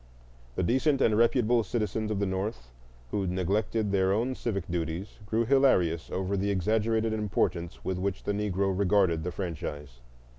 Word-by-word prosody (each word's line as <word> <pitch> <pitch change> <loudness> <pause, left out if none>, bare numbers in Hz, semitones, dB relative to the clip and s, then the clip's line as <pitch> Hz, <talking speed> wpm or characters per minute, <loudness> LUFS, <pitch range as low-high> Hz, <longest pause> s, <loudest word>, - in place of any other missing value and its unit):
The - - 0
decent 130 - +2
and 110 -5 +3
reputable 120 +1 +3
citizens 110 0 -2
of 105 - -1
the 100 - 0
North 95 - -3 0.4
who 100 -2 -1
neglected 100 +4 0
their 95 -1 +2
own 115 +6 +1
civic 100 -8 -3
duties 85 +4 -4
grew 115 +2 +1
hilarious 110 -12 +3
over 95 +1 -2
the 100 +1 0
exaggerated 110 +3 +1
importance 95 -5 -1
with 95 -1 -1
which 95 0 -2
the 100 - -1
Negro 100 -2 0
regarded 95 -4 +2
the 90 - -3
franchise. 75 -7 -6
100 Hz, 155 wpm, -28 LUFS, 90-110 Hz, 0.4 s, and